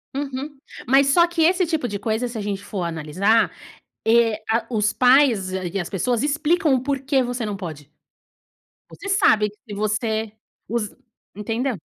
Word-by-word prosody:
Uhum. 275 0 -5 0.3
Mas 270 +2 +5
só 340 +5 +5
que 340 -1 -2
esse 365 +2 +3
tipo 315 -6 -1
de 205 - -4
coisa 220 +4 -1
se 235 -1 -7
a - - -3
gente 200 -1 -3
for 195 -3 -4
analisar, 170 +7 +1 0.6
eh, 225 -1 +3
a 225 0 +1
os 215 -2 +1
pais 250 -7 +4
e 185 0 -3
as 175 - -4
pessoas 235 - 0
explicam 300 +1 +2
o 255 - +2
porquê 275 0 0
você 245 -2 -3
não 205 -2 -4
pode. 155 -6 -8 1.0
Você 400 - -8
sabe 220 - +3 0.2
que 205 - -7
você 215 +1 -1 0.4
os 215 -2 -3 0.4
Entendeu? 225 +3 -2
230 Hz, 160 wpm, -22 LUFS, 205-275 Hz, 1.0 s, Mas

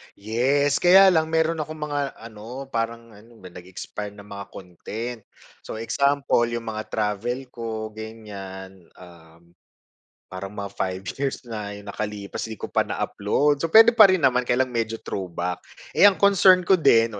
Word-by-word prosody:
Yes. 130 +7 +1
Kaya 190 +2 +7
lang 160 -2 +2
meron 160 0 0
akong 155 +1 -5
mga 145 -1 -2 0.2
ano, 115 +4 -9
parang 115 0 -3
ano 110 +3 -18
ba, 90 - -9
nag-expire 100 +3 -8
na 100 - -12
mga 100 -1 -8
content. 110 +6 -7 0.4
So - - -7
example, 140 0 +1
yung 115 -1 -5
mga 110 0 -5
travel 110 +5 -2
ko 110 -2 -5
ganiyan, 95 -4 -10
um, 85 -1 -17 0.8
parang 95 +2 -7
mga 100 -1 -5
5 95 -1 -3 0.2
years 135 -1 -2
na 105 -3 -6
yung 100 0 -9
nakalipas, 105 0 -5
'di 110 - -7
ko - - -8
pa - - +1
na-upload. 145 +8 0
So, 165 - -1
puwede 225 +6 +7
pa 220 -3 +8
rin 185 -5 +1
naman 125 -1 +2
kaya 125 +2 +3
lang 130 - -9
medyo 115 -1 -2
throwback. 90 -1 -4 0.3
Eh, 205 - +6
ang 195 - +4
concern 190 -2 +5
ko 185 +1 +3
din, 115 -7 +3
115 Hz, 165 wpm, -24 LUFS, 100-140 Hz, 0.8 s, pa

